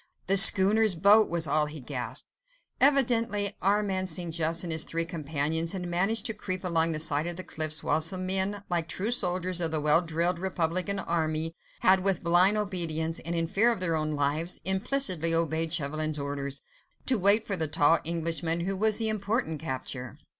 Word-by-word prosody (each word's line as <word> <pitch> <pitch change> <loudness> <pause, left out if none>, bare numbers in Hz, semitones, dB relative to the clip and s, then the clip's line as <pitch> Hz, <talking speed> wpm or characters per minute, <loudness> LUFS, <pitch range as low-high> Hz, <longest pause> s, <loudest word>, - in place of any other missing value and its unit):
"The 195 - +1
schooner's 195 +1 +9
boat!" 205 +6 +4
was 170 -1 -1
all 150 +1 0
he 150 +1 -9
gasped. 125 -1 -6 0.5
Evidently 230 -7 +1
Armand 195 -1 0
St. 170 0 0
Just 165 +1 -1
and 170 - -5
his 160 - +3
three 165 0 -2
companions 160 0 -3
had 180 -2 -5
managed 195 +5 0
to 225 - 0
creep 185 -3 -6
along 165 -2 +1
the 155 - -3
side 155 0 0
of 175 - -4
the 185 - -6
cliffs, 155 -2 -2
whilst 160 +1 0
the 185 - -6
men, 190 +2 -2
like 170 -2 -2
true 195 +6 -2
soldiers 180 -5 0
of 165 - 0
the 160 -1 -3
well 150 +2 +2
drilled 170 +1 -2
Republican 185 +1 -3
army, 165 -2 -3 0.3
had 185 0 +3
with 195 -3 0
blind 180 +5 +3
obedience, 165 -5 -3
and 170 +1 -5
in 165 0 -1
fear 220 +8 +2
of 230 - -3
their 165 -3 -1
lives, 155 +3 -2
implicitly 190 - +1
obeyed 165 -1 -1
Chauvelin's 155 -1 -2
orders—to 145 - -5
wait 200 +4 +3
for 200 - -1
the 160 -3 -2
tall 145 +2 +2
Englishman, 165 0 -2
who 195 +3 -2
was 215 +2 +1
the 225 - -1
important 210 - -3
capture. 130 -5 -7
170 Hz, 180 wpm, -27 LUFS, 160-195 Hz, 0.5 s, schooner's